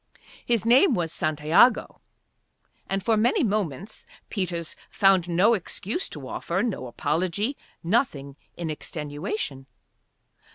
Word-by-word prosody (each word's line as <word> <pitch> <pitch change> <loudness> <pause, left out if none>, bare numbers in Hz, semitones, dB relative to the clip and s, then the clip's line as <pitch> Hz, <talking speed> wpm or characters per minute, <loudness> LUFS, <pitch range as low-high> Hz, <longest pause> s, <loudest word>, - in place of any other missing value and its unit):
His 235 -4 0
name 255 +5 +5
was 165 -4 -2
Santiago. 155 - +3 0.9
And 195 0 -1
for 225 - +3
many 240 - +2
moments 200 - -3 0.2
Peters 175 -5 -3
found 190 -4 +3
no 185 +7 +4
excuse 215 - -3
to - - -8
offer, - - -2
no 210 - -3
apology, 180 - -1 0.3
nothing 165 - 0 0.2
in 165 -2 -3
extenuation. 150 -2 -5
185 Hz, 110 wpm, -25 LUFS, 155-225 Hz, 0.9 s, name